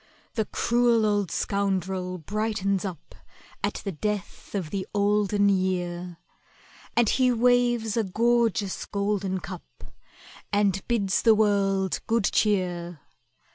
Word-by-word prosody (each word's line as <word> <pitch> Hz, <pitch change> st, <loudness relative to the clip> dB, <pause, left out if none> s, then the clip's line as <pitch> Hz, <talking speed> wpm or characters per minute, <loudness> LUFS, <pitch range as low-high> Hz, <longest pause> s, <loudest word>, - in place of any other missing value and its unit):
The 220 Hz, -2 st, 0 dB
cruel 235 Hz, 0 st, +2 dB
old 205 Hz, -3 st, +1 dB
scoundrel 190 Hz, -2 st, -1 dB
brightens 200 Hz, +1 st, -1 dB
up 180 Hz, -6 st, -7 dB, 0.5 s
At -, -, -2 dB
the 195 Hz, -, -1 dB
death 205 Hz, +4 st, -4 dB
of 180 Hz, -6 st, -3 dB
the 195 Hz, -2 st, -3 dB
Olden 205 Hz, 0 st, +2 dB
Year, 180 Hz, -2 st, -1 dB, 0.8 s
And 235 Hz, -1 st, +5 dB
he 255 Hz, +3 st, +3 dB
waves 240 Hz, -2 st, +2 dB
a 230 Hz, -, +2 dB
gorgeous 225 Hz, 0 st, +1 dB
golden 200 Hz, -2 st, -1 dB
cup, 180 Hz, -1 st, -10 dB, 0.7 s
And 200 Hz, -2 st, +2 dB
bids 200 Hz, -5 st, +1 dB
the 225 Hz, -2 st, +5 dB
world 195 Hz, -3 st, +1 dB
good 230 Hz, -1 st, +2 dB
cheer. 175 Hz, -6 st, 0 dB
200 Hz, 115 wpm, -26 LUFS, 190-220 Hz, 0.8 s, And